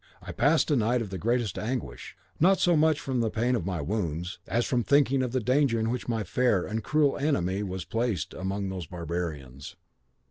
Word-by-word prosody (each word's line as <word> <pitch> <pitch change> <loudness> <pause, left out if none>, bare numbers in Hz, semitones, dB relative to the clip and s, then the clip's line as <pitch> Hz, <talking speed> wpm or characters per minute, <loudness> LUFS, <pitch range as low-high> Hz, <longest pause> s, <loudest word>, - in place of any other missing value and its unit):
I - - -8
passed 155 +2 +2
a - - +4
night 120 0 +1
of 100 - -8
the 95 - -4
greatest 115 -1 0
anguish, 110 - -5 0.2
not 190 +4 +4
so 175 -1 +4
much 155 -1 +3
from 130 -5 -2
the 115 -1 +1
pain 120 +3 0
of 95 -7 -2
my 90 -5 -2
wounds, 90 0 -3
as 120 +1 0
from 125 -2 +1
thinking 140 -1 +3
of 125 -2 -1
the 130 - +1
danger 125 0 +2
in 110 +1 0
which 125 0 -4
my 115 -2 0
fair 105 -1 +1
and 110 0 -3
cruel 150 -2 +2
enemy 100 - 0
was 95 -2 -4
placed 115 -4 -2
among 95 +1 -3
those 90 -4 -5
barbarians. 80 -6 -5
115 Hz, 205 wpm, -27 LUFS, 95-130 Hz, 0.2 s, a